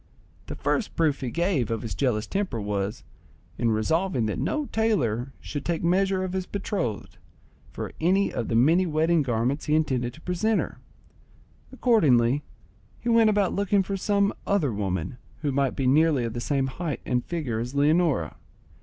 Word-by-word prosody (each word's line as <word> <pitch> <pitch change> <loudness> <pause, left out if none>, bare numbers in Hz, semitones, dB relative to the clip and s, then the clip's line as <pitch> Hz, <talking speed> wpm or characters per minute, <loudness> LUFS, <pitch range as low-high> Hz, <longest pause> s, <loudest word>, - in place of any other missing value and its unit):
The - - -5
first 225 - -1
proof 155 -4 +1
he 130 - -2
gave 170 - 0
of 115 +1 -2
his 115 - -4
jealous 120 -6 0
temper 195 - -2
was, 100 +1 -3 0.6
in 120 - +2
resolving 130 - +1
that 105 - -2
no 295 - -1
tailor 135 - 0
should 145 -2 -5
take 170 -1 -2
measure 190 +2 +2
of 185 -1 -4
his 185 -1 -2
betrothed 190 - -3 0.5
for - - -5
any 190 +4 +2
of 115 - -2
the 115 - -1
many 165 +10 +4
wedding 160 +1 +2
garments 125 +2 -1
he 150 - +2
intended 130 -6 0
to 155 - -15
present 210 +6 0
her. - - -4 0.9
Accordingly, 145 - +3 0.6
he 240 - -3
went 230 -1 +5
about 205 -3 +2
looking 200 0 +2
for 195 +1 -3
some 200 +1 +1
other 160 - +1
woman, 95 +1 -3 0.2
who 145 - +1
might 135 -1 0
be 135 - -1
nearly 145 0 +4
of 115 - -3
the 120 - -4
same 135 +1 0
height 150 +3 -4
and 125 -1 0
figure 145 -10 -3
as 125 +4 -5
Leonora. 150 - +2
150 Hz, 170 wpm, -26 LUFS, 120-185 Hz, 0.9 s, went